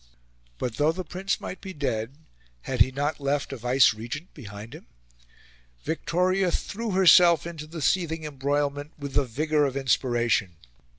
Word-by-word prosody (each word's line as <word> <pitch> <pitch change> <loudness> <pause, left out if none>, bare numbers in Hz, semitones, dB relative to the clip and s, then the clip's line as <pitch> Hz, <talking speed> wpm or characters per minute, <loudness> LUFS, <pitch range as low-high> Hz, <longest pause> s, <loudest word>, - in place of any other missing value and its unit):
But, 120 - -4
though 150 +2 +3
the 185 +3 -5
Prince 185 +3 -3
might 185 - -7
be 190 -1 -7
dead, 130 -4 -3 0.5
had - - -2
he 130 - +5
not 145 +4 -2
left 140 0 -1
a - - -3
vicegerent 125 +4 +1
behind 105 -4 -10
him? - - -12 1.0
Victoria 180 +3 0
threw 225 +6 -3
herself 175 -4 +6
into 160 -3 -7
the 160 -1 -6
seething 165 -2 0
embroilment 145 +1 -2
with 140 -2 -7
the 140 - +2
vigour 150 +5 0
of 135 -1 -2
inspiration. 120 -8 +1
145 Hz, 150 wpm, -26 LUFS, 130-170 Hz, 1.0 s, herself